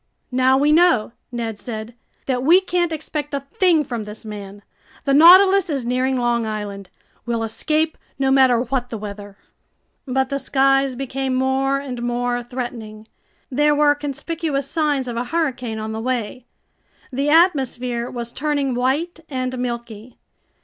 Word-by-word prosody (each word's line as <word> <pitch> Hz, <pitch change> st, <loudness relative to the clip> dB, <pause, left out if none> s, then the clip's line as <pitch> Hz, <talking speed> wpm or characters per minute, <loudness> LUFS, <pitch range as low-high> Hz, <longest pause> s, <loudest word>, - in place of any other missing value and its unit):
"Now 260 Hz, +1 st, +3 dB
we 290 Hz, +2 st, +3 dB
know," 315 Hz, -9 st, +4 dB, 0.2 s
Ned 230 Hz, -3 st, -4 dB
said, 220 Hz, -1 st, -6 dB, 0.3 s
"that 255 Hz, -2 st, -1 dB
we 330 Hz, +8 st, +6 dB
can't 350 Hz, -2 st, -1 dB
expect 300 Hz, -2 st, -4 dB
a -, -, 0 dB
thing 320 Hz, +3 st, +2 dB
from 240 Hz, -5 st, -4 dB
this 210 Hz, +1 st, -9 dB
man. 205 Hz, -1 st, -8 dB, 0.4 s
The 275 Hz, -, +2 dB
Nautilus 375 Hz, +5 st, +7 dB
is 275 Hz, -5 st, -2 dB
nearing 255 Hz, +2 st, 0 dB
Long 240 Hz, -1 st, +1 dB
Island. 205 Hz, -3 st, -5 dB, 0.4 s
We'll 230 Hz, -1 st, -1 dB
escape, 310 Hz, +8 st, -1 dB, 0.2 s
no 270 Hz, -1 st, +1 dB
matter 260 Hz, -3 st, +5 dB
what 250 Hz, 0 st, -2 dB
the 230 Hz, -, -5 dB
weather." 205 Hz, -1 st, -8 dB, 0.7 s
But 265 Hz, 0 st, 0 dB
the 275 Hz, -1 st, -2 dB
skies 270 Hz, 0 st, +2 dB
became 270 Hz, 0 st, -3 dB
more 265 Hz, +1 st, +1 dB
and 260 Hz, -3 st, -6 dB
more 245 Hz, 0 st, -1 dB
threatening. 235 Hz, -3 st, -7 dB, 0.4 s
There 295 Hz, +3 st, +3 dB
were 290 Hz, 0 st, +4 dB
conspicuous 290 Hz, 0 st, -3 dB
signs 295 Hz, -4 st, 0 dB
of 235 Hz, -1 st, -4 dB
a 240 Hz, -, -1 dB
hurricane 255 Hz, -7 st, -2 dB
on 220 Hz, 0 st, -4 dB
the 220 Hz, 0 st, -4 dB
way. 245 Hz, 0 st, -3 dB, 0.7 s
The 280 Hz, +3 st, 0 dB
atmosphere 260 Hz, -7 st, +2 dB
was 235 Hz, -1 st, -6 dB
turning 285 Hz, -2 st, -1 dB
white 275 Hz, +8 st, -1 dB
and 255 Hz, -2 st, -3 dB
milky. 235 Hz, -1 st, -6 dB
255 Hz, 150 wpm, -21 LUFS, 235-290 Hz, 0.7 s, Nautilus